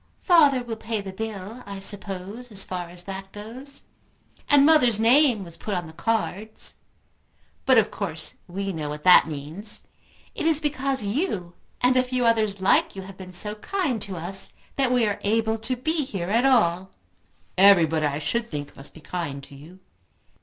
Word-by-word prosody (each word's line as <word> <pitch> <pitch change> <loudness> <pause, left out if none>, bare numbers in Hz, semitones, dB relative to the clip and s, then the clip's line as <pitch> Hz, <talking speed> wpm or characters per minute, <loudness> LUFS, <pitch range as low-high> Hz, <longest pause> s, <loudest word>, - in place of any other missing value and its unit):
"Father 290 -8 +5
will 230 -2 -5
pay 220 0 -3
the 195 -1 -7
bill, 220 +2 -6
I 200 -1 -6
suppose, 200 +4 -3
as 195 -2 +5
far 180 -2 -5
as 175 0 -6
that 195 0 -8
goes. 245 +7 -4 0.7
And 285 -1 +6
mother's 250 -9 +5
name 240 -1 +4
was 170 -2 -11
put 210 - -4
on 175 -1 -3
the 160 - -11
cards. 220 +1 -3 0.9
But 260 -2 +6
of 220 -1 +3
course 165 -6 0
we 195 +2 -4
know 155 -3 -4
what 150 0 -7
that 180 -2 +7
means. 160 +8 -3 0.5
It - - -2
is 320 -2 +4
because 275 -5 -2
you 200 - -2 0.3
and 250 +1 +3
a 255 - +5
few 250 -1 -1
others 215 -4 +1
like 190 - +3
you 190 - -6
have 195 0 -11
been 185 -1 -10
so 210 +4 -2
kind 260 - -2
to 195 -3 -5
us, 180 +4 0 0.2
that 265 -2 +1
we 245 -2 +3
are 205 -1 -2
able 220 +1 0
to 250 +3 -1
be 310 +5 -1
here 190 -9 -5
at 235 +5 +3
all." 190 -8 +2 0.7
"Everybody, 165 -5 +5
I 145 0 -2
should 235 +10 -2
think, 145 -2 -6
must 135 - -7
be 160 - -13
kind 145 -3 -5
to 140 - -13
you." 165 +7 -14
205 Hz, 180 wpm, -24 LUFS, 180-245 Hz, 0.9 s, that